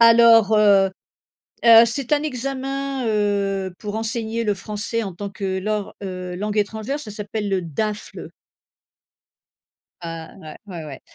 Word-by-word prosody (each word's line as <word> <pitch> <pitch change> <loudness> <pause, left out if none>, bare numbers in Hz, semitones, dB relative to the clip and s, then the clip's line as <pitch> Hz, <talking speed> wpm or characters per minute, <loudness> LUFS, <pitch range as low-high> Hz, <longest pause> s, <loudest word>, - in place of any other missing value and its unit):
Alors, 230 -2 +7
heu 200 -2 +5 0.7
heu, 230 0 +9
c'est 255 +4 -1
un 290 - 0
examen, 270 -1 -3
heu, 200 -3 0
pour 210 -1 -6
enseigner 225 0 -2
le 210 -2 +1
français 215 +3 -3
en 195 -3 -5
tant 200 +3 -5
que 190 -1 -3
lors, 210 +1 -3
heu, 180 -2 -5
langue 210 +2 -3
étrangère 220 +7 -2
ça 220 -7 -7
s'appelle 210 0 -4
le 190 -1 +1
DAFLE. 210 +6 -4 1.7
Ah, 165 -1 -7
ouais, 155 -1 -10
ouais 170 -4 -7
ouais. 140 -3 -8
210 Hz, 140 wpm, -22 LUFS, 195-230 Hz, 1.7 s, heu